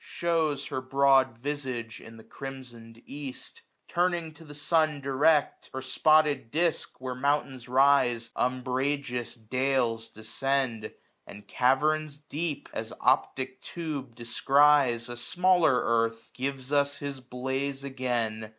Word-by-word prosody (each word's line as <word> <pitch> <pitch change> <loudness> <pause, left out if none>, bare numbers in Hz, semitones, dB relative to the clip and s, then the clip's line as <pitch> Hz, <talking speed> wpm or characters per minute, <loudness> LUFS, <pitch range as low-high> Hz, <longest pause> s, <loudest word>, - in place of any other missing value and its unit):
Shews 160 -5 -1
her 130 - -3
broad 135 -2 +3
visage 130 -4 -4
in 115 0 -12
the 110 - -13
crimson'd 120 -4 -10
east; 140 -2 -8 0.3
Turn'd 175 -3 0
to 165 - -13
the 145 -2 -11
sun 155 0 +1
direct, 140 +2 +2
her 130 - -4
spotted 150 -1 +3
disk. 165 +4 -1
Where 130 0 -4
mountains 135 -2 -1
rise, 125 -3 +3
umbrageous 130 -1 -1
dales 120 -1 -1
descend. 115 +2 -2 0.4
And 105 0 -12
caverns 145 +3 +1
deep, 150 +1 -4
as - - -4
optic 130 0 +1
tube 145 -8 -6
descries, 130 +1 +3
1091 120 - -6
A - - -9
smaller 175 +3 +3
earth, 115 0 0
gives 135 +1 -4
us 140 0 +2
his 140 -1 -5
blaze 130 +2 -3
again. 120 -5 -2
135 Hz, 125 wpm, -28 LUFS, 120-145 Hz, 0.4 s, broad